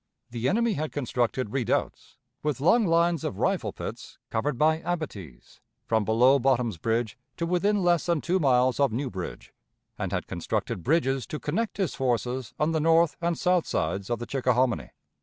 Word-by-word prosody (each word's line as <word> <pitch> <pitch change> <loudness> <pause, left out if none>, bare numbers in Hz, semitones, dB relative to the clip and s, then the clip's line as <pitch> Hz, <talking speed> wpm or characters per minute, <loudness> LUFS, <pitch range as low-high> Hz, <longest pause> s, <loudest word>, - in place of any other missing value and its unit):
The 120 +1 -1
enemy 230 +2 +2
had 155 -3 -3
constructed 125 -3 -1
redoubts, 130 -3 -2 0.2
with 150 -4 -1
long 200 - +4
lines 170 -1 +2
of 95 - -3
rifle - - 0
pits - - -8
covered 130 +4 -1
by 155 +3 +3
abatis, 105 - -6 0.3
from 110 -3 +1
below 125 +6 +4
Bottom's 120 -7 +1
Bridge 115 +3 -1 0.2
to 170 - -1
within 195 +3 +1
less 175 -2 +2
than 170 -2 +2
two 180 +5 0
miles 130 -4 +3
of 140 -4 +3
New 130 +4 -2
Bridge, 95 -2 -7 0.5
and - - -2
had - - -2
constructed - - -3
bridges 135 -3 +1
to 150 - -5
connect 210 +10 -2
his 190 -7 -1
forces 125 -1 -1
on 150 +2 +2
the 160 - +1
north 165 +1 +3
and 170 0 0
south 180 -2 +2
sides 90 +5 -2
of 120 - 0
the 120 - -6
Chickahominy. 125 - 0
135 Hz, 175 wpm, -27 LUFS, 120-170 Hz, 0.5 s, long